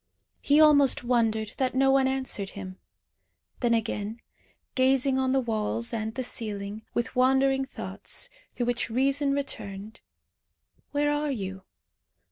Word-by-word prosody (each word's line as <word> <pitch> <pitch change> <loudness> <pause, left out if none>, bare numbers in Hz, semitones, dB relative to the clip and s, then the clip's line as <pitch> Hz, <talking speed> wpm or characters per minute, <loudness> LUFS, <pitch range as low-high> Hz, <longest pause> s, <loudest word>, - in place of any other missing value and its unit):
He 290 +2 +4
almost 285 -5 +6
wondered 225 -3 +1
that 260 -1 0
no 270 0 +4
one 270 -1 +4
answered 260 -7 -2
him. 185 -1 -8 0.8
Then 235 -2 +2
again, 220 0 -3 0.5
gazing 265 0 +3
on 260 0 +1
the 270 - +3
walls 230 0 -1
and 220 -1 -3
the 260 - -2
ceiling, 210 -3 -4
with 240 +3 -2
wandering 265 +1 +3
thoughts, 385 - -6 0.3
through 245 - -1
which 245 -1 -1
reason 275 +4 +1
returned. 215 -7 -5 0.9
"Where 290 0 +1
are 295 0 0
you? 190 -6 -5
255 Hz, 130 wpm, -27 LUFS, 220-270 Hz, 0.9 s, almost